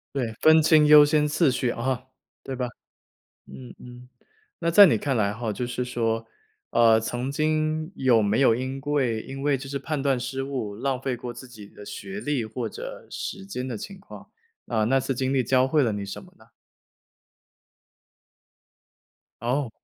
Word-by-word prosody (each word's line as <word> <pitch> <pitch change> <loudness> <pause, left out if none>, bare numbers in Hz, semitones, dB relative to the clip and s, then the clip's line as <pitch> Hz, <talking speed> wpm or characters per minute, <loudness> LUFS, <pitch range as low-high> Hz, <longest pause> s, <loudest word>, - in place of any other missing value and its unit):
对， 125 -5 -1
分 160 0 +6
清 155 -1 +5
优 150 0 +9
先 150 0 +2
次 155 -1 +2
序 125 -1 -1
啊， 130 +1 -3 0.4
对 135 - -6
吧？ 125 -1 -3 0.8
嗯 65 -2 -11
嗯， 125 0 -13 0.5
那 170 - 0
在 200 +5 +9
你 170 - +3
看 140 -2 -1
来 100 -3 +1
吼， 110 0 -4
就 125 - -3
是 125 +1 -3
说， 115 -2 -1 0.5
呃， 115 -1 +5
曾 120 +4 -3
经 155 +1 0
有 125 -4 +3
没 105 +1 +1
有 130 -4 +5
因 130 +3 -3
桂 135 -6 0
因 135 +3 -8
为 145 -1 +2
就 135 +1 -9
是 140 0 -3
判 145 0 -3
断 135 -3 +1
失 130 +2 -4
误， 130 -7 -4
浪 130 +3 -2
费 135 -2 -2
过 120 0 -7
自 120 +2 -11
己 105 -4 -12
的 105 - -13
学 195 - -7
历 145 - -1
或 110 +2 -4
者 - - -9
时 95 - -6
间 125 +6 -5
的 125 -4 -4
情 195 - -8
况？ 190 - -13 0.4
啊， 110 -2 0
那 135 +5 +2
次 135 0 -2
经 130 +2 -1
历 135 - +3
教 130 +2 +2
会 150 +3 +2
了 115 -5 +1
你 100 -1 -4
什 100 - -7
么 - - -18
呢？ - - -21 2.9
哦。 125 +2 -1
130 Hz, 195 characters per minute, -25 LUFS, 115-145 Hz, 2.9 s, 优